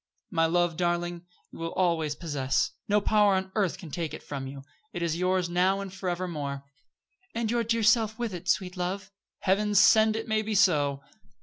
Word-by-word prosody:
"My 165 -3 +2
love, 175 -1 +1
darling, 175 0 -1 0.2
you - - -12
will 165 0 -4
always 165 -5 +1
possess. 145 -5 -1 0.2
No 210 0 +3
power 205 -1 +3
on 190 0 -2
earth 200 -6 0
can 165 -5 -10
take 165 +1 -3
it - - -11
from 135 -2 -5
you. 135 0 -9 0.3
It 175 -3 -3
is 165 -2 0
yours 180 0 +1
now 180 +3 +2
and 195 -2 -6
forevermore." 175 -7 -3 0.7
"And 230 -1 -1
your 235 -1 +1
dear 230 0 0
self 220 0 +3
with 235 -4 -3
it, 180 +1 -6
sweet 180 -1 0
love." 185 +3 -4 0.3
"Heaven 205 +2 +1
send 220 +2 +6
it 225 +1 -4
may 220 -1 +1
be 215 0 -3
so." 145 -8 +3
180 Hz, 190 wpm, -28 LUFS, 165-205 Hz, 0.7 s, send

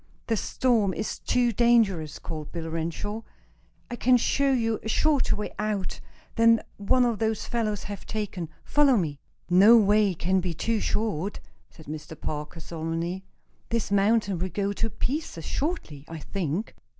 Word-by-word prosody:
"The 225 - +1
storm 220 -4 +1
is 190 - -3
too 245 -1 +2
dangerous," 215 -9 +3
called 155 -2 -7
Bill 165 -2 -5
Renshaw. 170 +7 -3 0.7
"I - - -2
can 250 +1 +4
show 275 +3 +2
you 225 -4 +1
a 220 - -5
shorter 295 +3 +2
way 210 0 -5
out 210 -3 -2 0.4
than 230 0 +7
the - - -6
one 240 +3 +2
those 220 -1 -1
fellows 215 -4 -1
have 205 -1 -7
taken. 200 -6 -4
Follow 285 -4 +4
me." 150 -7 -2 0.3
"No 195 +6 +7
way 210 -2 +4
can 185 +3 +1
be 175 -2 -3
too 225 +6 0
short," 205 -4 -1 0.3
said 160 - -15
Mr. 155 +1 -8
Parker, 150 +2 -5
solemnly. 165 +3 -4 0.5
"This 230 -3 -1
mountain 200 -2 +2
will 185 +2 -1
go 200 +1 -1
to 225 +2 -1
pieces 255 - -3
shortly, 270 - -3
I 165 - -7
think!" 180 +3 -3
205 Hz, 155 wpm, -26 LUFS, 170-230 Hz, 0.7 s, than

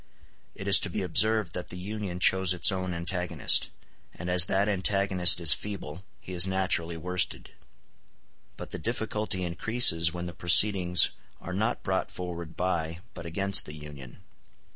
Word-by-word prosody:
It 100 - -9
is 100 - +7
to 100 - -2
be 90 - -4
observed 105 0 +2
that 90 - -6
the 90 - -9
Union 100 -1 -6
chose 95 0 +2
its 90 - +6
own 95 -1 -4
antagonist; 90 +1 +1 0.5
and 90 +1 -6
as 90 0 +6
that 100 +3 -1
antagonist 95 -2 +2
is 80 -5 +4
feeble, 95 -5 -8 0.2
he 95 - -11
is 90 +1 +2
naturally 90 -3 -2
worsted. 90 +2 -2 1.1
But - - -10
the - - -6
difficulty 110 -4 -3
increases 85 -2 +2
when 90 +1 -7
the 85 - -8
proceedings 90 -1 +4 0.3
are 90 - -8
not 110 +5 -3
brought 95 0 -2
forward 85 -3 -8
by 85 -2 -3
but 85 -3 -10
against 100 +4 0
the 75 - -9
Union. 75 -4 -12
90 Hz, 155 wpm, -26 LUFS, 85-100 Hz, 1.1 s, is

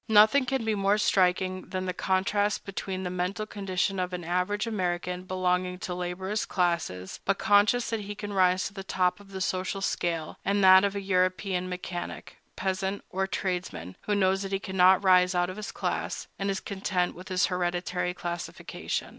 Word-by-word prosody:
Nothing 220 +5 +6
can 265 -3 -1
be 220 - +1
more 200 0 +2
striking 185 -2 +1
than 185 0 -3
the 185 - -2
contrast 200 +3 0
between 190 -1 -4
the 180 - -3
mental 185 +4 -2
condition 195 -2 -1
of 180 0 -2
an 180 -1 -4
average 180 +5 0
American 180 -4 -2
belonging 180 0 0
to 185 - -6
the 180 - -2
laborious 185 +4 -2
classes, 170 - -1
but 195 0 +1
conscious 210 +4 +3
that 225 - 0
he 205 0 -6
can 205 0 -6
rise 185 -1 +3
to - - -5
the 195 -1 -6
top 185 0 +1
of 200 -1 -16
the 190 -1 -6
social 185 +1 -1
scale, 170 -4 -2
and 200 +1 +1
that 190 0 +8
of 200 0 0
a 200 - -2
European 185 -1 0
mechanic, 180 -1 -6 0.2
peasant, 190 +1 -2
or 190 +1 0
tradesman, 175 - -3
who 210 - +2
knows 190 -1 +2
that 195 -1 -4
he 195 - +1
cannot 190 0 +4
rise 180 -1 +5
out 175 +1 +1
of 185 - -10
his 215 0 -5
class, - - -3
and 195 0 -1
is 195 -1 -1
content 190 -3 -1
with 180 +2 -11
his 185 0 +2
hereditary 180 0 -1
classification. 175 -1 -4
185 Hz, 190 wpm, -28 LUFS, 180-200 Hz, 0.2 s, that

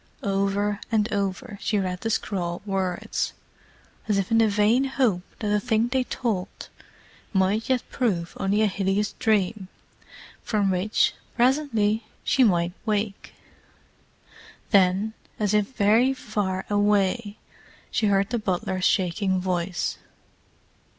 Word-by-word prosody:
Over 200 +1 0
and 220 0 +1
over 200 0 -3
she 210 - 0
read 185 -2 -2
the 225 - -2
scrawled 180 -5 -2
words, 190 -3 -2 0.7
as 210 -2 +2
if 195 +1 -1
in 225 - +5
the 225 - +5
vain 210 +5 +3
hope 250 -9 +1 0.2
that 210 - -3
the 210 0 +2
thing 230 +1 +1
they 255 +1 +1
told 210 -9 -3 0.6
might 195 +4 +1
yet 255 -2 +2
prove 185 -10 -1
only 200 +3 +2
a - - +5
hideous 200 +1 0
dream 210 -2 +1 0.7
from 205 -3 +1
which, 185 +4 +2 0.2
presently, 235 -5 +2 0.2
she 265 - +3
might 175 -5 +2
wake. 210 -2 -2 1.4
Then, 195 +2 +3 0.3
as 210 -1 +1
if 210 -1 +3
very 230 +5 +4
far 205 -6 -2
away, 205 +1 +1 0.5
she 215 - +1
heard 200 +1 +2
the 240 - 0
butler's 185 -2 -1
shaking 190 +1 +1
voice. 180 -1 -2
205 Hz, 125 wpm, -25 LUFS, 190-220 Hz, 1.4 s, in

